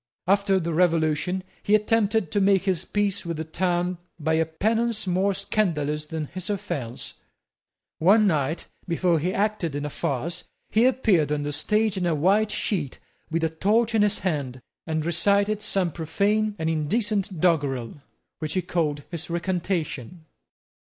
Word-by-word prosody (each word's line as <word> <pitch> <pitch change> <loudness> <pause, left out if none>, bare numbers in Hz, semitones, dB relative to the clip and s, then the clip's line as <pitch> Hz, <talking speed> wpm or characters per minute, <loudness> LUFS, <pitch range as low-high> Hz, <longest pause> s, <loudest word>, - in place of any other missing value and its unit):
After 195 0 +3
the 170 -1 -2
Revolution, 165 +1 +1 0.2
he 210 - +3
attempted 215 -4 +2
to 205 - +1
make 195 -1 +4
his 185 -3 -1
peace 205 -1 0
with 170 -2 -4
the 160 - -2
town 175 +2 -1 0.2
by 160 +1 0
a 160 0 +2
penance 220 +7 0
more 190 +2 +1
scandalous 150 -7 -1
than 160 -1 -3
his 185 +5 -7
offence. 135 - -4 0.8
One 205 +6 +5
night, 155 -3 0 0.2
before 170 -1 +2
he 175 +5 0
acted 200 -7 -1
in 145 0 -2
a 150 - -4
farce, 145 +7 -3 0.3
he 225 +3 +4
appeared 210 - +3
on 150 -1 0
the 145 0 -3
stage 210 +5 +1
in 180 -2 0
a 165 - +2
white 200 +8 +3
sheet 160 - -2 0.3
with 165 +1 -1
a 160 - +2
torch 215 +8 +1
in 220 - +3
his 210 0 +2
hand, 140 -8 -3 0.2
and 160 -1 -1
recited 200 +5 +2
some 190 -4 0
profane 205 +7 0
and 160 - -2
indecent 195 +4 0
doggerel, 145 -7 0 0.4
which 155 +1 -3
he 185 - +1
called 150 -5 -1
his 170 0 -5
recantation. 170 - -2
175 Hz, 155 wpm, -25 LUFS, 155-200 Hz, 0.8 s, One